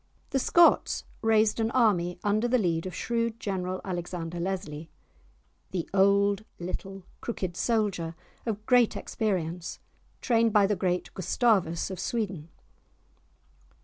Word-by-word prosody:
The 270 - +2
Scots 340 +6 +4 0.2
raised 220 0 +3
an 225 0 +1
army 195 -8 +2
under 215 +3 +2
the 255 +1 +3
lead 170 -5 0
of 185 - -7
shrewd 230 -1 -1
general 185 -3 -3
Alexander 175 -2 -4
Leslie, 170 -4 -4 0.8
the 180 -3 -3
"old, 200 +1 +3
little, 190 +2 -6 0.2
crooked 185 -7 -4
soldier," 195 -8 0 0.3
of 215 -2 -4
great 245 -2 +4
experience, 180 -5 -2 0.4
trained 230 -2 +2
by 205 -2 +6
the 205 +1 +1
great 180 -2 -1
Gustavus 190 -4 +1
of 185 - -6
Sweden. 185 -7 -3
195 Hz, 120 wpm, -28 LUFS, 175-225 Hz, 0.8 s, by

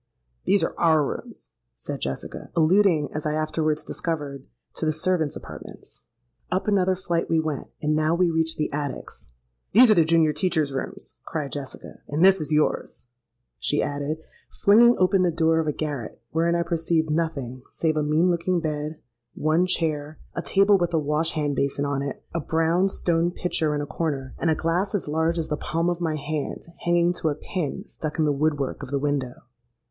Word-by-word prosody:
'These 200 +1 +3
are - - -1
our 160 -3 +4
rooms,' - - -7 0.3
said - - -6
Jessica—alluding, 160 - +1
as 155 0 -3
I 150 - 0
afterwards 155 0 0
discovered, 145 -5 -4 0.3
to 160 - -2
the - - +3
servants' 160 -1 0
apartments. - - -11 0.5
Up 185 +3 0
another 190 -2 +3
flight 170 -2 -2
we 165 -1 +3
went; 155 -3 -3 0.2
and 150 0 +2
now 155 +2 +2
we 175 -1 +2
reached 160 0 0
the 150 - -2
attics. 145 - -5 0.5
'These 235 +2 +8
are - - +8
the 170 -5 +5
junior 160 -1 +3
teachers' 155 -3 0
rooms,' 135 - -5
cried 150 -4 -4
Jessica, 140 -2 -7
'and 150 +5 +2
this 190 -2 +6
is 150 - -3
yours,' 150 -4 0 0.5
she 145 - +1
added, 145 +2 -2 0.3
flinging 235 +4 +5
open 185 +1 +3
the 180 - +3
door 160 0 +2
of 160 - -1
a - - +2
garret, 145 -6 -4
wherein 170 +1 +2
I 170 - +1
perceived 165 -2 0
nothing 145 -6 -2
save 160 -1 0
a 155 - +1
mean 155 +4 +3
looking 175 +1 0
bed, 150 -1 -3 0.4
one 160 +4 +2
chair, 155 -4 -1 0.2
a 170 - -3
table 195 +2 +4
with 175 -1 0
a - - +4
wash 150 +2 0
hand 145 -2 -1
basin 140 +1 0
on 140 -1 -1
it, 140 -1 -5
a 170 - 0
brown 165 +4 +2
stone 170 -2 +1
pitcher 165 -4 -1
in 145 - -1
a - - -3
corner, 140 -2 -3
and 165 - +1
a 160 - +3
glass 180 +6 0
as 195 - -2
large 160 +3 +1
as 165 - -2
the 150 - -1
palm 165 +3 0
of 175 0 -4
my 160 -2 0
hand 150 0 -4 0.2
hanging 175 0 +3
to 160 -2 -1
a 145 - -1
pin 155 -1 -4
stuck 155 -1 -5
in 160 - +2
the 150 - +3
wood 145 +1 +1
work 135 -2 -3
of - - -7
the 140 - 0
window. 140 -3 -2
160 Hz, 195 wpm, -25 LUFS, 150-170 Hz, 0.5 s, These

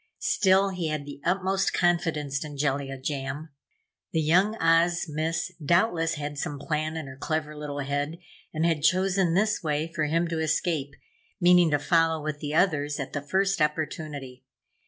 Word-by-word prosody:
Still, 195 0 +3
he 180 -3 -3
had 155 -2 -3
the 145 0 -9
utmost 190 +1 +1
confidence 160 -5 0
in 150 -2 -8
Jellia 135 -1 -1
Jam. 140 +3 -4 0.6
The 160 - +2
Young 185 +8 +3
Oz 170 -1 +3
Miss 160 +3 -2
doubtless 170 +1 +2
had 145 -1 -5
some 150 -2 -3
plan 155 +2 -2
in 160 - -4
her 130 -1 -9
clever 155 +2 -3
little 145 -1 -5
head 145 +3 -2 0.3
and 160 +1 0
had 165 -3 +1
chosen 185 +1 +2
this 210 +2 +2
way 155 +1 -1
for 155 -2 0
him 165 +3 +1
to 165 -1 -2
escape, 155 -3 -1 0.4
meaning 175 -2 +6
to 145 - +3
follow 165 +1 +2
with 150 -1 -4
the 150 +1 -4
others 150 -5 +1
at 140 - -5
the 145 - -2
first 190 +5 0
opportunity. 150 -4 -3
155 Hz, 165 wpm, -27 LUFS, 145-175 Hz, 0.6 s, meaning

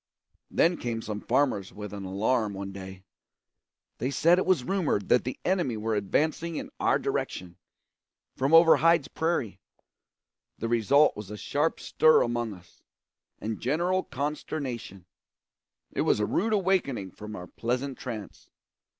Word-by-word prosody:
Then 170 +1 +3
came 115 -2 -3
some 105 -1 -5
farmers 120 -7 +1
with 105 -1 -8
an 100 -1 -6
alarm 105 +2 0
one 100 0 -5
day. 95 -1 -9 1.0
They 125 - -1
said 170 +5 +4
it - - -1
was 180 -9 +3
rumoured 155 - 0
that 125 - +4
the 125 - -4
enemy 175 - +1
were 110 +1 -2
advancing 155 - 0
in - - -5
our - - +3
direction, 90 -1 -3 0.8
from 135 +3 0
over 165 0 +8
Hyde's 165 -3 +3
prairie. 145 - -1 1.0
The 115 - -3
result 120 +6 +4
was 105 -2 -8
a 105 - -6
sharp 150 +8 -1
stir 155 0 +4
among 120 -3 -2
us, 90 -1 -20 0.6
and 110 0 -4
general 175 +8 +1
consternation. 130 - -5 0.9
It - - -1
was - - +2
a 105 - +2
rude 220 - 0
awakening 180 - 0
from 105 +3 -9
our 90 - -7
pleasant 125 +6 -3
trance. 110 -5 -7
120 Hz, 145 wpm, -28 LUFS, 105-155 Hz, 1.0 s, over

